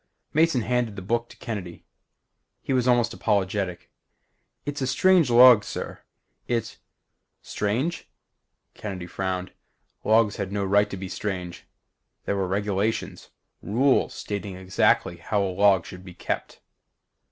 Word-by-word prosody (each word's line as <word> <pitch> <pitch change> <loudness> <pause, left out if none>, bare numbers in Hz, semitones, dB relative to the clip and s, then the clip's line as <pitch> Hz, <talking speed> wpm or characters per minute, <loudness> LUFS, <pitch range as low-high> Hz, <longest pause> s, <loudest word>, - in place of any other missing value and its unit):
Mason 160 -4 +3
handed 120 -2 -1
the 95 - -7
book 115 +4 -1
to - - -15
Kennedy. 100 -8 -6 0.8
He - - -1
was 125 -1 +1
almost 120 -2 +3
apologetic. 95 -3 -1 0.7
"It's 145 0 -4
a 130 - 0
strange 170 +3 +4
log, 120 -2 +8
sir, - - -6 0.5
It 115 -2 -2 0.3
" - - -53
"Strange?" 130 +12 -1 0.6
Kennedy 95 -4 -6
frowned. 90 0 -4 0.5
Logs 110 -1 +3
had 100 -1 -4
no 100 -1 -1
right 100 +2 +3
to 100 - -6
be 95 0 -6
strange. 90 -3 -5 0.6
There 100 - 0
were 95 -1 -1
regulations 100 +3 -2 0.3
rules 130 +6 +2
stating 100 -2 -5
exactly 95 -1 +1
how 100 +4 -1
a 95 -1 -2
log 95 -2 +4
should 90 0 -10
be 90 -2 -11
kept. - - -4
105 Hz, 135 wpm, -25 LUFS, 95-120 Hz, 0.8 s, log